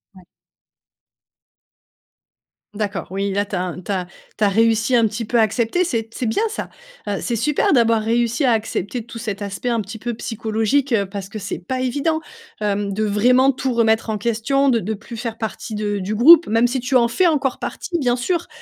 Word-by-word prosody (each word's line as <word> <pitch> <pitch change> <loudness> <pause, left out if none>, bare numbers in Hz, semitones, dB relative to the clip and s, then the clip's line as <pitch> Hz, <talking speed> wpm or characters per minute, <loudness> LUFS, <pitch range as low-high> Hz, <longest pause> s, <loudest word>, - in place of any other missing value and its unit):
Ouais. 185 - -15 2.5
D'accord. 205 -2 -3
Oui, 195 +1 -1
là 200 +1 0
tu 205 - -5
as 180 - -1
un 180 0 -5
tu 205 - -5
as 180 -2 -2 0.3
tu 215 - 0
as 205 - +5
réussi 225 +3 +2
un 230 -2 +4
petit 220 +2 -4
peu 235 +2 +1
à - - +6
accepter, 230 - +1
c'est 225 -8 -2
c'est 250 - -3
bien 225 - 0
ça! 450 - -5 0.4
Heu, 205 - -1
c'est 235 -2 -2
super 295 +5 +1
d'avoir 230 -4 +4
réussi 235 +4 +1
à 255 - +4
accepter 225 +1 -2
tout 235 - -9
cet 215 -3 -5
aspect 200 +4 -3
un 235 -1 +1
petit 215 +2 -6
peu 240 +2 -4
psychologique, 225 +5 -1
heu, 200 -4 +2
parce 195 0 -7
que 215 - -6
c'est 200 - -5
pas 255 +8 -4
évident, 285 +5 0 0.4
hem, 205 -1 -1
de 215 +2 0
vraiment 250 +6 +4
tout 260 -1 -2
remettre 225 -1 +2
en 215 - -1
question, 235 +5 +1
de 235 -3 +3
de 220 +3 -3
plus 225 +3 -9
faire 225 0 -5
partie 220 0 -5
de 205 -1 -2
du 190 +3 -3
groupe. 315 +9 +7
Même 230 +2 +3
si 255 0 -2
tu 255 +2 -1
en 235 - +3
fais 355 +10 +2
encore 280 -5 0
partie 345 - -4
bien 245 -2 +1
sûr, 340 +7 -1
225 Hz, 210 wpm, -20 LUFS, 210-250 Hz, 2.5 s, groupe